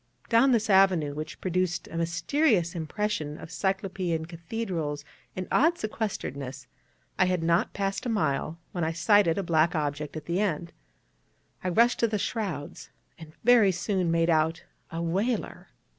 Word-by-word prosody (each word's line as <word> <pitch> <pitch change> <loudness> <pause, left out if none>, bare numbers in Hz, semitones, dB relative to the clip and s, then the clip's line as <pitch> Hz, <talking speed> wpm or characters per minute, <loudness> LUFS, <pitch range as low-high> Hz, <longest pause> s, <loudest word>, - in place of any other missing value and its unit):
Down 235 +4 +5
this 225 -3 +2
avenue, 190 -7 +4
which 155 +1 -6
produced 185 -1 -1
a - - -9
mysterious 170 - +1
impression 165 -2 -3
of - - -10
Cyclopean 190 -3 -1
cathedrals 170 -3 -4 0.3
and 185 0 -4
odd 325 +4 +4
sequesteredness, 140 - -4 0.5
I 185 - +6
had 180 -2 0
not 170 +1 +2
passed 195 +4 -2
a - - -1
mile, 155 -6 0
when 175 - -2
I 160 +1 0
sighted 180 0 +4
a 200 - 0
black 165 0 +2
object 150 0 -2
at 155 - -8
the 170 +2 -1
end. 170 -4 -1 0.9
I 185 - 0
rushed 235 +7 +3
to 230 - +3
the 215 -1 -1
shrouds, 195 -9 -4 0.3
and 160 -1 -11
very 230 -4 +6
soon 180 0 -1
made 165 0 +2
out 160 +1 +1 0.3
a 165 +1 -4
whaler. 200 +8 -2
175 Hz, 155 wpm, -27 LUFS, 160-205 Hz, 0.9 s, I